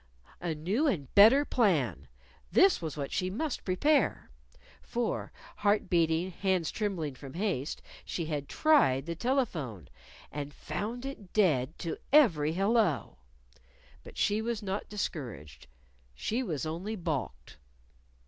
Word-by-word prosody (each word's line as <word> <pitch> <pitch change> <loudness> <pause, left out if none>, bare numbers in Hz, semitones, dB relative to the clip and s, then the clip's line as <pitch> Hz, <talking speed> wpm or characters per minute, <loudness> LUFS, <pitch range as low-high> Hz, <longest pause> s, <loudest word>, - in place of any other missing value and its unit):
A 170 -2 -2
new 195 - 0
and 175 - +1
a 135 - -20
better 230 +8 +7
plan! 140 - +1 0.4
this 360 - +5
was 155 -3 -5
what 140 -1 -4
she 185 - -1
must 275 +9 -3
prepare. 280 +10 +1 0.5
For 240 0 -2 0.3
heart 205 0 +1
beating, 170 +1 +2
hands 185 -2 0
trembling 185 -9 -2
from 135 +2 -11
haste 175 -7 -2 0.2
she 170 - -3
had 145 -3 -4
tried 145 - +3
the 170 - -3
telephone 165 - -2 0.4
and 145 0 -6
found 240 +5 -4
it 220 -9 -8
dead 155 -8 +2
to 165 - -4
every 165 - +5
Hello! 195 - +1 0.8
But - - -13
she 210 +2 +2
was 230 -1 -3
not 195 +1 -3
discouraged. 115 - -5 0.5
She 230 - -1
was 160 - -3
only 175 +8 -4
balked. 155 - -4
180 Hz, 130 wpm, -30 LUFS, 150-220 Hz, 0.8 s, better